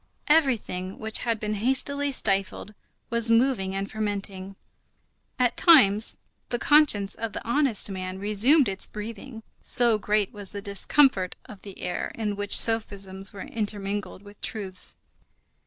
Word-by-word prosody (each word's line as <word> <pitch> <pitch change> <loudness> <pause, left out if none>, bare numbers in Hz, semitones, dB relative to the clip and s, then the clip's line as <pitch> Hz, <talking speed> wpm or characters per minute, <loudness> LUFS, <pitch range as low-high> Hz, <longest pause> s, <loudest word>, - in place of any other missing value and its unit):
Everything 240 - 0
which 220 0 -1
had 230 -2 -2
been 210 0 -3
hastily 270 +6 -1
stifled 195 -3 -1 0.4
was 235 0 +1
moving 230 -5 +1
and 195 +1 -4
fermenting. 200 -2 -4 0.8
At 245 -1 +1
times 220 - +4 0.3
the 240 - -2
conscience 240 -8 +3
of 225 -3 -5
the - - -8
honest 240 -6 +1
man 185 0 -6
resumed 215 +9 +3
its 190 -1 -1
breathing, 225 +2 -9 0.2
so 235 -3 +3
great 210 -1 -1
was 205 -2 -4
the 200 - -5
discomfort 200 0 +1
of 205 - -13
that 200 -2 -12
air 180 - -4
in 210 -2 -3
which 205 0 +6
sophisms 200 -4 +2
were 195 - -10
intermingled 205 -2 -4
with 205 0 -16
truths. 190 -4 -5
210 Hz, 140 wpm, -25 LUFS, 195-235 Hz, 0.8 s, which